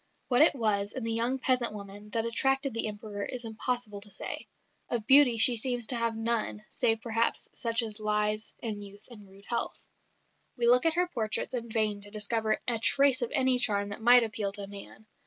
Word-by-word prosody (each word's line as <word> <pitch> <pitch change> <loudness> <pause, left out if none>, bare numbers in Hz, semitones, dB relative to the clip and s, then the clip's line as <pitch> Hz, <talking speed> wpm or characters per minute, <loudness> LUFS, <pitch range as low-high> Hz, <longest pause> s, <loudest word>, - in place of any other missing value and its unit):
What 250 +1 +3
it 310 - +6
was 210 -4 -1
in 260 - -6
the 230 0 -1
young 235 +3 0
peasant 255 -3 0
woman 205 +1 -10
that 225 +1 -2
attracted 270 +3 0
the 230 -1 0
Emperor 205 -1 -7
it 255 - -5
is 245 -1 -7
impossible 225 -2 -4
to 205 - -11
say. - - -7 0.4
Of 235 -3 -2
beauty 265 -2 +6
she 240 +2 +8
seems 245 0 -1
to 250 - 0
have 230 -1 0
had - - -7
none 225 -2 -1
save 225 -1 +1
perhaps 230 0 -1
such 230 0 0
as 220 -1 -4
lies 210 0 -1
in 215 -3 -4
youth 205 0 -13
and 210 -4 -14
rude 195 +1 -18
health. 235 - -3 0.8
We 240 - -1
look 250 +5 +4
at 325 - 0
her 355 +1 +2
portraits 225 -5 -3
in 235 -2 -4
vain 215 -2 0
to 205 - -6
discover 215 +1 0
a 235 -2 +1
trace 275 +2 +4
of 240 - -2
any 260 -3 +2
charm 205 -4 +1
that 205 +3 -8
might 245 +1 +6
appeal 215 -3 -3
to 200 -1 -4
man. 200 +2 -11
225 Hz, 210 wpm, -28 LUFS, 210-245 Hz, 0.8 s, she